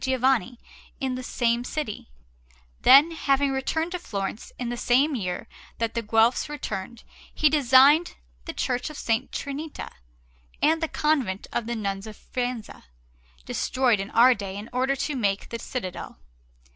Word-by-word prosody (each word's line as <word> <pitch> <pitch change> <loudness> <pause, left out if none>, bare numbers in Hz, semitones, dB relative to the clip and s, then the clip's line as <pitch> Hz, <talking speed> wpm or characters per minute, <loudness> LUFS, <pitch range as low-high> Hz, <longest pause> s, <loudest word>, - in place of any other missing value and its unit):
Giovanni 260 -3 +1 0.4
in 265 -3 -1
the 255 - -4
same 240 -1 0
city; 250 - -5 0.7
then, 280 +5 +7
having 280 -3 +1
returned 320 +5 -1
to 360 - -3
Florence 200 - -5
in 245 -1 -3
the 240 - -2
same 265 +5 +2
year 185 -3 -3 0.3
that 230 -1 -1
the 235 - -1
Guelphs 225 +5 +2
returned, 230 -6 -5 0.3
he 305 -2 +3
designed 285 +3 +5 0.3
the - - -5
Church 250 +3 -2
of 305 - -9
S. 225 +1 +1
Trinita, 285 +2 -5 0.7
and 320 +2 +2
the 325 - +1
Convent 275 -13 0
of 230 - -2
the 235 - -2
Nuns 200 -1 -3
of 215 - -10
Faenza, 245 - -5 0.6
destroyed 250 - +1
in 195 +1 -4
our 245 +3 +6
day 200 -3 -6
in 210 +3 -8
order 260 +2 +1
to 280 +2 -2
make 200 -5 -1
the 230 - -5
citadel. 190 - -6
250 Hz, 155 wpm, -25 LUFS, 225-275 Hz, 0.7 s, then